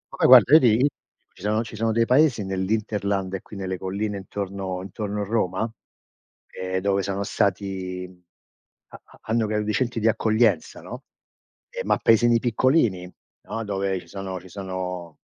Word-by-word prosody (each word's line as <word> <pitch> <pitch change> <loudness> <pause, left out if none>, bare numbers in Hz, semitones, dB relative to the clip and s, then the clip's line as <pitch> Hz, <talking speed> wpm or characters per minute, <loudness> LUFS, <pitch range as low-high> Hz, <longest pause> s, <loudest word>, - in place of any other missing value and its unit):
Poi - - +3
guarda, - - +8
io 155 - +11
ti 115 -6 +4
di 130 +4 +4 0.5
ci - - -17
sono 105 +3 0
ci 110 -1 -10
sono 115 +1 0
dei 115 +1 +2
paesi 125 -3 +3
nell'hinterland 100 0 -1
e 95 - -3
qui 105 - -11
nelle 95 -1 -4
colline 100 +2 -3
intorno 95 -1 -5
intorno 105 +2 -4
Roma, 105 -1 -1 0.8
ehm, 95 0 -3
dove 100 0 +1
sono 100 +1 -2
stati 95 -2 -2 0.8
ha - - -13
ha - - -21
hanno 110 0 0
grandi 105 0 -1
centri 120 +1 -1
di 110 - +1
accoglienza, 110 -5 +1
no. - - -9 0.7
Eh, - - -5
ma - - +2
paesini 120 +1 +4
piccolini, 115 - +1 0.3
no, 115 - -4
dove 95 -2 -1
ci 85 - -18
sono 95 0 -6
ci 95 - -15
sono, 90 -3 -6
100 Hz, 160 wpm, -24 LUFS, 95-110 Hz, 0.8 s, io